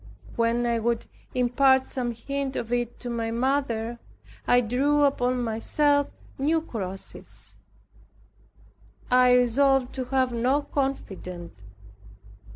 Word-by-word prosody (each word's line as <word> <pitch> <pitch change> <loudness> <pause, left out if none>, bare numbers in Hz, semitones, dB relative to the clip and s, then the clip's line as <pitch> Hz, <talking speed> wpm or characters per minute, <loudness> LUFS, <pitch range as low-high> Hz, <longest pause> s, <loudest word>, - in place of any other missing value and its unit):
When 235 +1 +1
I 235 -1 +1
would 235 0 -1 0.3
impart 265 +2 +4
some 250 -2 -3
hint 275 +3 -4
of 235 +1 -3
it 240 -1 -2
to - - -6
my 230 -1 -2
mother, 235 -2 -1 0.5
I 245 - +5
drew 275 +6 +2
upon 250 -3 +1
myself 285 +6 +1 0.3
new 310 +4 +2
crosses. 195 - -7 1.6
I 250 0 +6
resolved 255 +1 +3
to 260 -1 -3
have 255 -1 +1
no 255 +5 +1
confidant. 185 - -4
245 Hz, 110 wpm, -26 LUFS, 230-270 Hz, 1.6 s, I